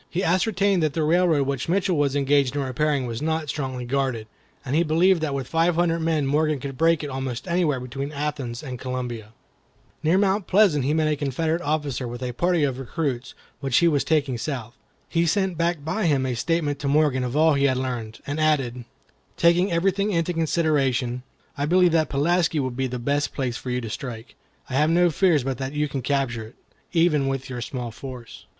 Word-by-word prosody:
He 180 +3 -2
ascertained 195 +1 +2
that 155 -2 +1
the 160 - 0
railroad 160 -2 +3
which 135 +1 -3
Mitchell 185 0 +1
was 145 -2 +1
engaged 140 -1 +2
in 145 - 0
repairing 135 +1 0
was 115 0 -4
not 160 -1 -1
strongly 130 -4 -3
guarded, 130 -3 -1 0.4
and 135 +2 -1
he 165 - +4
believed 170 +2 +3
that 145 -3 -1
with 135 -2 -3
five 165 +1 +2
hundred 170 -1 +1
men 160 -3 0
Morgan 150 +1 +1
could 135 0 -6
break 165 +2 +2
it 145 - -4
almost 130 +1 -4
anywhere 170 -6 +1
between 135 +3 -5
Athens 145 -5 -4
and 130 -4 -6
Columbia. 125 -4 -5 0.7
Near 160 +4 +3
Mount 195 0 +1
Pleasant 185 -9 +4
he 150 +3 +1
met 155 -1 +2
a 155 - +1
Confederate 155 +4 -1
officer 145 -5 -2
with 120 +2 -6
a 125 - -2
party 175 +5 +1
of 135 -2 -1
recruits 135 -2 -3 0.2
which 135 -3 +1
he 170 - +5
was 145 -5 +2
taking 140 -5 0
south. 120 -3 -5 0.3
He 170 0 +1
sent 190 0 +1
back 170 -2 -1
by 175 +4 0
him 140 -4 +2
a 130 - -1
statement 145 +2 -1
to 140 - -3
Morgan 140 -3 +2
of 125 +3 -2
all 160 0 +5
he 140 0 +2
had 130 -2 +2
learned, 120 -4 -4
and 145 +2 -3
added: 135 -6 +1 0.5
"Taking 175 +3 +3
everything 195 +4 +1
into 170 -1 0
consideration, 140 -7 0 0.3
I 145 0 -1
believe 180 +1 +4
that 160 -1 +2
Pulaski 165 +3 +1
will 130 -2 -1
be 130 +2 -2
the 125 0 -4
best 140 +4 -1
place 125 -4 -2
for 125 - -6
you 125 0 -1
to 115 - -6
strike. 120 -2 -7 0.3
I - - -8
have 150 +4 +3
no 175 +1 +4
fears 160 -4 +3
but 130 -1 -3
that 135 +1 -4
you 150 0 0
can 135 -2 -4
capture 125 -4 -1
it, 115 - -18 0.4
even 165 -5 +2
with 135 -1 -3
your 125 -1 -4
small 125 -4 -5
force." 125 -1 -10
145 Hz, 210 wpm, -24 LUFS, 130-165 Hz, 0.7 s, he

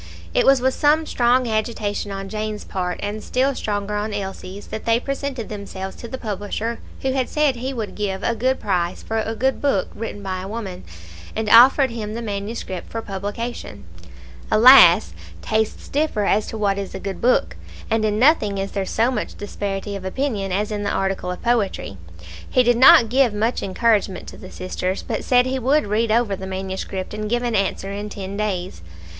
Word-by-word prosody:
It - - +2
was 270 -2 +6
with 260 +1 +2
some 305 +2 +3
strong 245 -2 +2
agitation 215 -2 -2
on 195 0 -5
Jane's 215 0 -4
part, 180 -2 -3
and 210 +1 -4
still 265 +2 +1
stronger 205 -4 -3
on 210 0 -2
Elsie's, 195 0 -6
that 220 - -6
they 230 0 +3
presented 275 -3 -4
themselves 195 -2 -6
to 235 - -8
the 260 - -6
publisher 215 +1 -4 0.2
who 265 - +1
had 260 -1 -1
said 300 -3 +2
he 255 +3 -4
would 225 -5 -4
give 195 -2 -3
a 235 - +1
good 255 +4 0
price 180 -4 -1
for 225 0 -2
a 220 +1 -2
good 265 +4 0
book 270 -10 +1
written 210 -2 -6
by 185 -1 -3
a 190 - -6
woman, 200 -4 -6 0.5
and 220 0 -2
offered 260 +3 +7
him 215 -2 -5
the 235 - -4
manuscript 200 -3 -5
for 225 0 -5
publication. 205 - -5 0.7
Alas! 215 - +8 0.3
tastes 220 0 -1
differ 285 -8 0
as 205 +2 +2
to 225 - -5
what 200 -2 0
is 195 -1 -6
a - - -4
good 195 0 -5
book, 250 +1 +2 0.3
and 225 -1 +1
in 210 -1 +1
nothing 225 -6 +3
is 195 0 -3
there 195 -2 -2
so 230 +3 +1
much 255 - -3
disparity 200 0 -4
of 195 - -6
opinion 200 -1 -2
as 205 +3 -1
in 210 -1 -2
the 205 - -1
article 190 -2 -1
of 180 - -6
poetry. 215 - 0 0.5
He 255 - +4
did 245 0 +3
not 260 -2 +8
give 250 -3 +3
much 225 +4 0
encouragement 205 -1 +1
to - - -12
the 185 - -11
sisters, 185 +1 -3
but - - -3
said 250 -1 +4
he 260 +1 -1
would 275 +5 +2
read 215 +2 0
over 225 -3 +2
the 190 0 -7
manuscript 190 0 -5
and 215 0 -4
give 240 +1 0
an 240 -1 -1
answer 195 0 -1
in 205 +1 -5
ten 195 -1 -6
days. 190 - -3
215 Hz, 195 wpm, -21 LUFS, 195-240 Hz, 0.7 s, Alas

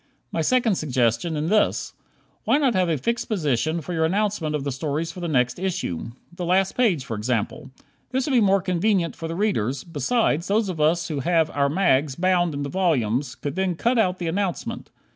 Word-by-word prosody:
My - - -1
second 240 -7 +2
suggestion 130 +3 0
in 155 +2 -1
this: 210 +1 +1 0.5
Why 275 - +4
not 275 -5 +2
have 185 -3 +1
a 160 - +1
fixed 235 - -2
position 155 - 0
for 165 +4 -6
your 160 -1 +1
announcement 185 -3 0
of 145 - -2
the 140 - -2
stories 150 +4 -2
for 180 - -10
the 175 - -3
next 125 -4 +1
issue? 185 - -3 0.3
The 180 - -5
last 185 +2 +2
page, 190 - +2
for 115 - -4
example. 120 +5 -2 0.4
This 260 0 -1
would 290 - -2
be 250 -3 +4
more 195 -2 +3
convenient 185 -1 +1
for 165 - -5
the 165 - -4
readers; 140 - 0
besides, 170 - 0
those 210 0 +1
of 165 -4 -3
us 165 +4 +2
who 150 -3 -2
have 165 +1 +2
"our 140 -1 +1
mags" 145 -5 +2
bound 175 -2 +1
into 140 0 -3
volumes 135 - 0
could 145 - -5
then 190 -2 0
cut 235 +8 +1
out 185 -4 +2
the 175 - -4
announcement. 185 +1 -3
170 Hz, 200 wpm, -24 LUFS, 145-195 Hz, 0.5 s, Why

